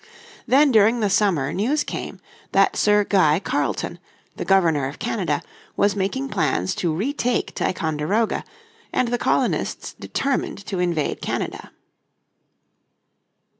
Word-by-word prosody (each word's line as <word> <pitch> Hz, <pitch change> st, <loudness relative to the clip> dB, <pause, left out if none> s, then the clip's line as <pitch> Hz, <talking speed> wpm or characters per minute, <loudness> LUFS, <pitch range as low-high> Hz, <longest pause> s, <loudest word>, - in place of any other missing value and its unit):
Then 280 Hz, +2 st, +5 dB
during 225 Hz, +1 st, +4 dB
the 205 Hz, -3 st, +1 dB
summer 185 Hz, -8 st, +2 dB
news 270 Hz, +10 st, +1 dB
came -, -, -6 dB, 0.3 s
that -, -, +4 dB
Sir 210 Hz, 0 st, +4 dB
Guy 175 Hz, -6 st, +3 dB
Carleton, -, -, -2 dB, 0.4 s
the -, -, -4 dB
Governor 165 Hz, -8 st, +3 dB
of 140 Hz, -, -8 dB
Canada, 175 Hz, -9 st, -1 dB, 0.3 s
was 200 Hz, 0 st, +3 dB
making 210 Hz, +8 st, -2 dB
plans 145 Hz, -, 0 dB
to 170 Hz, -, 0 dB
retake 245 Hz, -, -1 dB
Ticonderoga, 175 Hz, +6 st, -1 dB, 0.5 s
and 245 Hz, -, +1 dB
the 245 Hz, 0 st, -1 dB
colonists -, -, 0 dB
determined 275 Hz, -1 st, -2 dB
to 190 Hz, -4 st, -3 dB
invade 170 Hz, -4 st, -1 dB
Canada. -, -, -4 dB
195 Hz, 120 wpm, -22 LUFS, 160-230 Hz, 0.5 s, Then